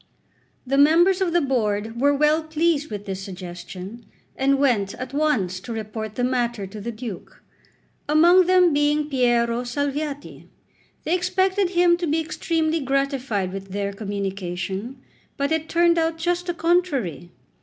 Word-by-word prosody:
The 275 Hz, +2 st, +1 dB
members 345 Hz, +6 st, +5 dB
of 365 Hz, -3 st, +1 dB
the 345 Hz, 0 st, +3 dB
Board 225 Hz, -4 st, -1 dB
were 285 Hz, +1 st, +5 dB
well 300 Hz, +2 st, +3 dB
pleased 315 Hz, -1 st, 0 dB
with 205 Hz, -2 st, -6 dB
this 195 Hz, -2 st, -5 dB
suggestion, 185 Hz, +3 st, -8 dB, 0.3 s
and 275 Hz, +1 st, +2 dB
went 235 Hz, -8 st, +1 dB
at 255 Hz, +1 st, -7 dB
once 250 Hz, -12 st, 0 dB
to 200 Hz, -, -9 dB
report 220 Hz, -1 st, -5 dB
the 245 Hz, -, -1 dB
matter 240 Hz, -4 st, -1 dB
to 205 Hz, +2 st, -9 dB
the 235 Hz, -, -4 dB
Duke, 220 Hz, -4 st, -9 dB, 0.7 s
among 345 Hz, +4 st, +6 dB
them 365 Hz, -3 st, +5 dB
being 295 Hz, +1 st, +1 dB
Piero 240 Hz, -2 st, +2 dB
Salviati. 285 Hz, +3 st, -4 dB, 0.6 s
They 320 Hz, -, -1 dB
expected 375 Hz, +1 st, +1 dB
him 350 Hz, -1 st, +3 dB
to 350 Hz, -1 st, -3 dB
be 310 Hz, +2 st, +1 dB
extremely 320 Hz, 0 st, -1 dB
gratified 270 Hz, -8 st, -1 dB
with 195 Hz, -1 st, -7 dB
their 200 Hz, 0 st, -2 dB
communication, 195 Hz, +3 st, -4 dB, 0.4 s
but 280 Hz, +2 st, -1 dB
it 320 Hz, 0 st, -1 dB
turned 340 Hz, 0 st, +3 dB
out 325 Hz, 0 st, 0 dB
just 350 Hz, +2 st, -1 dB
the 350 Hz, -, -2 dB
contrary. 320 Hz, -, 0 dB
275 Hz, 150 wpm, -23 LUFS, 210-325 Hz, 0.7 s, among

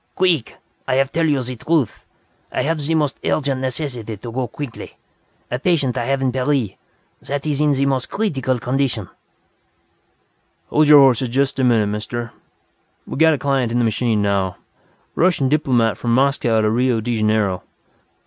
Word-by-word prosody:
"Queek! 175 Hz, -10 st, +1 dB, 0.3 s
I -, -, +1 dB
have 135 Hz, 0 st, +1 dB
tell 165 Hz, 0 st, +1 dB
you 145 Hz, -3 st, +2 dB
zee 125 Hz, +1 st, -5 dB
truth! 150 Hz, -1 st, -1 dB, 0.5 s
I -, -, -1 dB
have 155 Hz, +1 st, -1 dB
zee 160 Hz, +3 st, 0 dB
most 150 Hz, -3 st, 0 dB
urgent 140 Hz, -3 st, 0 dB
necessity 125 Hz, -5 st, -3 dB
to 115 Hz, +4 st, -8 dB
go 125 Hz, +1 st, -2 dB
queekly. 135 Hz, +1 st, -8 dB, 0.6 s
A 125 Hz, -, -1 dB
patient 145 Hz, -6 st, +1 dB
I 120 Hz, -, -2 dB
have 135 Hz, +1 st, 0 dB
in 130 Hz, -, +1 dB
Paree, 130 Hz, -5 st, -1 dB, 0.5 s
zat 140 Hz, +1 st, -4 dB
ees 150 Hz, -1 st, 0 dB
in 150 Hz, -2 st, +3 dB
zee 135 Hz, +1 st, +1 dB
most 135 Hz, -2 st, -1 dB
creetical 135 Hz, -, -1 dB
condition!" 125 Hz, -6 st, -1 dB, 1.6 s
"Hold 155 Hz, 0 st, +4 dB
your 150 Hz, -1 st, +9 dB
horses 130 Hz, -2 st, +3 dB
just 135 Hz, +2 st, 0 dB
a -, -, +2 dB
minute, 115 Hz, -4 st, +3 dB
Mister. 110 Hz, +3 st, -4 dB, 0.7 s
We -, -, -6 dB
got 160 Hz, +1 st, +5 dB
a -, -, -5 dB
client 135 Hz, -4 st, 0 dB
in 120 Hz, -, 0 dB
the 120 Hz, -, +2 dB
machine 110 Hz, -1 st, 0 dB
now. 100 Hz, -2 st, 0 dB, 0.6 s
Russian 165 Hz, -7 st, +2 dB
diplomat 125 Hz, -7 st, +1 dB
from 120 Hz, -1 st, +1 dB
Moscow 130 Hz, -4 st, +2 dB
to 110 Hz, -, +2 dB
Rio 125 Hz, 0 st, +1 dB
de 120 Hz, +2 st, -2 dB
Janeiro.... 105 Hz, -3 st, +1 dB
130 Hz, 170 wpm, -20 LUFS, 115-145 Hz, 1.6 s, your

